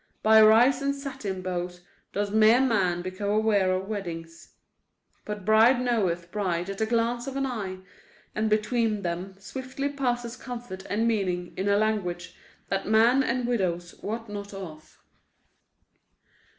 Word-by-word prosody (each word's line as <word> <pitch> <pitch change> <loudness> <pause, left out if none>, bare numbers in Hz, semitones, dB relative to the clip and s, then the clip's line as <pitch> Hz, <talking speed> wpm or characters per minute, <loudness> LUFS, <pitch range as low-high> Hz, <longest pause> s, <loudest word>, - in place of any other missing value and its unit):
By 220 0 +7
rice 240 +5 +6
and 280 0 0
satin 265 -10 -5
bows 180 -1 -4 0.3
does 205 0 -2
mere 220 +3 +6
man 190 -9 +1
become 185 +2 -4
aware 205 -3 +2
of 185 +1 -1
weddings. 170 -5 -7 0.7
But 210 -2 -6
bride 225 +4 +5
knoweth 190 -9 0
bride 185 -3 -1
at 195 - -7
the 220 - +1
glance 235 +2 0
of 270 - -5
an 275 - 0
eye. 205 -8 -4 0.6
And 215 0 0
between 215 0 +1
them 180 +2 -4
swiftly 260 +6 -5
passes 245 -4 -2
comfort 235 -7 -8
and 225 +3 +1
meaning 185 -6 -1
in 195 +2 -1
a 200 - +4
language 190 -5 -1 0.3
that 195 0 -2
man 230 +5 +5
and 250 -1 -1
widows 180 -7 -1
wot 225 +2 -4
not 205 -1 -7
of. 160 -5 -10
210 Hz, 145 wpm, -27 LUFS, 185-235 Hz, 0.7 s, By